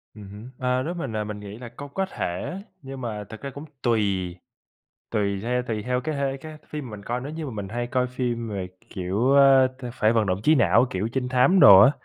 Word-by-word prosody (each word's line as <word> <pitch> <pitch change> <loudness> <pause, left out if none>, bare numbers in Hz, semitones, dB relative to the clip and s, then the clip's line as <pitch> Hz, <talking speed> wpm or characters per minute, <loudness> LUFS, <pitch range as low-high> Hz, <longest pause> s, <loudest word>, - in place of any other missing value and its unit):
Ừm 105 -2 -10
hứm. 105 +5 -10
Ơ, 125 0 +1
nếu 170 +4 -3
mình, 135 -10 -5
ờ, 105 0 -1
mình 105 0 -6
nghĩ 105 +1 -9
là 120 -1 -9
có 140 +4 -9
có 190 +7 -2
thể, 135 - -4 0.2
nhưng 135 -1 -8
mà 105 -4 -4
thực 110 +2 -11
ra 140 - -5
cũng 140 +3 -9 0.2
tùy, 100 -7 0 0.8
tùy 100 -2 0
theo 125 +1 0
tùy 110 -3 -3
theo 125 +2 -1
cái 155 +4 -3
hê 135 -1 -1
cái 155 +2 -10
phim 145 -6 -6
mình 105 -1 -8
coi. 120 +1 -2
Nếu 145 +4 -6
như 160 -1 -5
mà - - -5
mình 100 -3 -5
hay 120 +2 -3
coi 125 0 0
phim 120 -2 -3
về, 95 -3 -4 0.2
kiểu, 100 +7 0
ơ, 135 -2 +7
t 130 - -10
phải 110 -1 +2
vận 110 -2 +2
động 90 +1 0
trí 155 +5 +5
não, 115 - +4
kiểu, 100 +4 -2
trinh 125 -2 -1
thám 130 +9 +4
đồ 100 -9 +10
á, 130 - +8
120 Hz, 245 wpm, -25 LUFS, 105-135 Hz, 0.8 s, đồ